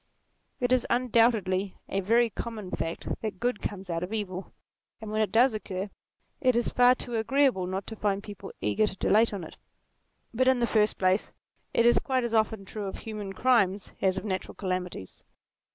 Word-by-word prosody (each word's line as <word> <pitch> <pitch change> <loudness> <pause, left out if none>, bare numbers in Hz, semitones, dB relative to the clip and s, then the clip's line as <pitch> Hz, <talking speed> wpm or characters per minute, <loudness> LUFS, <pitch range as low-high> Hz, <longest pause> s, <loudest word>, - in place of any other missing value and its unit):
It 245 0 0
is 255 -1 +3
undoubtedly 225 -6 +2
a 195 - -1
very 230 +4 +3
common 215 -3 -6
fact 165 - -4
that 215 -4 -4
good 245 -2 -1
comes 195 -2 -5
out 165 -1 -2
of 180 +3 -4
evil, 195 -4 -4 0.5
and 220 -2 -7
when 215 0 +1
it 215 - 0
does 240 +2 +5
occur, 195 -2 -4 0.5
it 255 -4 +3
is 235 - +2
far 250 0 +5
too 240 -2 -3
agreeable 235 -4 +2
not 190 +1 -3
to 220 - -7
find 200 -2 -1
people 205 -3 -9
eager 105 - +2
to 195 - -5
dilate 225 +2 +3
on 200 -4 -5
it. 160 - -10 0.8
But 255 +3 +2
in 260 -1 +5
the 240 - +2
first 215 -2 +2
place, 185 +2 +1 0.4
it 230 - +3
is 240 - +6
quite 260 -2 0
as 235 -1 -2
often 220 -2 +1
true 210 +1 -5
of 190 - -5
human 210 -3 -6
crimes, 200 -5 +2
as 190 -1 +2
of 190 - -4
natural 190 -3 -3
calamities. 185 - -4
215 Hz, 190 wpm, -28 LUFS, 190-235 Hz, 0.8 s, is